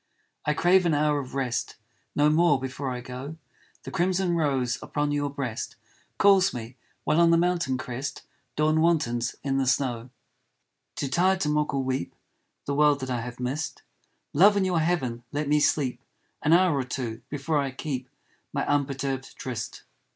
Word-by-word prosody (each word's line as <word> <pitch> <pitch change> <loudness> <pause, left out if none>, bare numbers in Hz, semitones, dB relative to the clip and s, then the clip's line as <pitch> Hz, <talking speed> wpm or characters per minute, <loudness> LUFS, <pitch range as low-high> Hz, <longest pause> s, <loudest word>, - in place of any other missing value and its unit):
I 150 - +2
crave 180 +1 +4
an 160 - +2
hour 150 0 +2
of 130 -1 -7
rest 130 -3 -2 0.4
No 145 0 +4
more 155 -3 +4
before 130 +1 -4
I 125 -1 -4
go, 130 +5 -7 0.5
The - - -7
crimson 185 -1 +1
rose 135 -6 0
upon 145 0 -1
your 145 0 0
breast 135 -5 -4 0.4
Calls 195 -5 +5
me, 120 +1 -7 0.3
while 155 +3 +3
on 170 - +6
the 165 - +5
mountain 170 -6 +1
crest 130 +2 -5 0.3
Dawn 155 +1 +2
wantons 120 -9 +1
in 135 -1 0
the 135 - 0
snow. 125 -2 0 0.9
Too 140 - -2
tired 185 +6 +2
to 150 - +1
mock 150 -1 +1
or 135 - 0
weep 130 -8 -2 0.5
The 140 - -1
world 145 0 +4
that 130 0 -4
I 120 -2 -1
have 125 +1 -7
missed, 130 +4 -3 0.5
Love, 205 +7 +6
in 195 - +2
your 180 -3 +1
heaven 135 -8 -1
let 145 0 -2
me 150 +1 +3
sleep 140 -4 +1 0.4
An 155 - +1
hour 175 -2 +5
or 135 - 0
two, 125 -3 -4
before 145 +1 -1
I 140 -1 0
keep 130 -1 -5 0.4
My 140 - -1
unperturbed 135 -2 -1
tryst. 120 -4 -5
145 Hz, 175 wpm, -26 LUFS, 130-160 Hz, 0.9 s, on